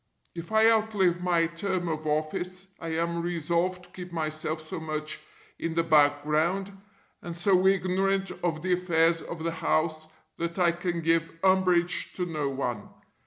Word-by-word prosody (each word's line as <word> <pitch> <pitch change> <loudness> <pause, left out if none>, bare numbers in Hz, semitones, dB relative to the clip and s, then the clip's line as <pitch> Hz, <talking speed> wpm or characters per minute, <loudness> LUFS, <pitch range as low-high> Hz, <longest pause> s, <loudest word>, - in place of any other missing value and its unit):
If 170 +3 -8
I 220 0 +5
outlive 210 -6 +2
my 175 -2 +2
term 175 +2 -2
of 155 -1 -3
office 175 +5 -2
I 165 - -6
am 170 +1 -1
resolved 175 +2 -1
to - - -15
keep 180 -1 -9
myself 155 -1 -2
so 155 +1 -6
much 155 -1 -4 0.4
in 165 -1 -3
the 165 - +2
background, 155 +5 +2 0.5
and 170 -1 -6
so 185 +1 +3
ignorant 195 0 +1
of 160 -2 -1
the 185 -1 +2
affairs 165 -2 +2
of 165 -1 -7
the 165 - 0
house 155 -1 0 0.3
that 170 +1 -3
I 175 -2 +4
can 175 0 -3
give 165 0 +1
umbrage 185 -2 +2
to 180 - -2
no 155 -5 -2
one. 125 -6 -3
170 Hz, 160 wpm, -27 LUFS, 160-185 Hz, 0.5 s, I